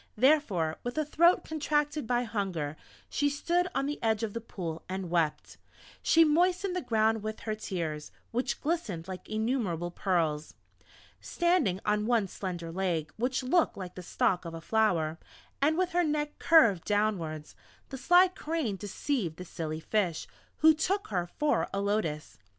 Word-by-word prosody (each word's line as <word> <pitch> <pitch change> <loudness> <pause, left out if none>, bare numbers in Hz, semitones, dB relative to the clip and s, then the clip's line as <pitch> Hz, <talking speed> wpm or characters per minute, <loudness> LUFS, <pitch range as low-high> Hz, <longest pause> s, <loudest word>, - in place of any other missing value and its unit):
Therefore, 215 - +2
with 245 +4 -5
a 310 - +1
throat 340 +4 +4
contracted 295 -3 -1
by 245 +1 +1
hunger, 190 -10 -3 0.3
she 290 0 +1
stood 345 +5 0
on 275 - +1
the 295 +1 -4
edge 220 -1 +1
of 215 -2 -2
the 230 - -4
Pool 170 -7 -6
and 185 -2 -4
wept; 165 -3 -1 0.4
she 330 - +5
moistened 360 +4 +2
the 365 - -1
ground 220 -3 +1
with 215 +1 -5
her 215 - -2
tears, 165 -8 -4 0.2
which 250 +3 -2
glistened 235 - -2
like 185 -1 -8
innumerable 215 -7 -1
pearls. 165 -5 -1 0.6
Standing 345 - +1
on 210 0 +1
one 230 -5 +2
slender 175 -3 -5
leg 170 -4 -2
which 250 +3 -1
looked 325 +7 +2
like 185 -2 -6
the 185 - -8
stalk 180 +1 0
of 165 -1 -7
a - - -6
flower, 170 -6 +1 0.4
and 310 +3 +3
with 370 0 +1
her 355 0 +2
neck 295 -1 -2
curved 230 - +5
downwards, 185 -8 -1 0.3
the 270 - -6
sly 355 +5 +6
Crane 315 - -3
deceived 205 - -2
the 180 - -7
silly 160 -2 -4
Fish, 180 -2 -1 0.3
who 315 +1 +8
took 375 +6 -1
her 180 -4 -1
for 300 0 +1
a 195 - -2
Lotus. 165 - -2
215 Hz, 160 wpm, -29 LUFS, -, 0.6 s, who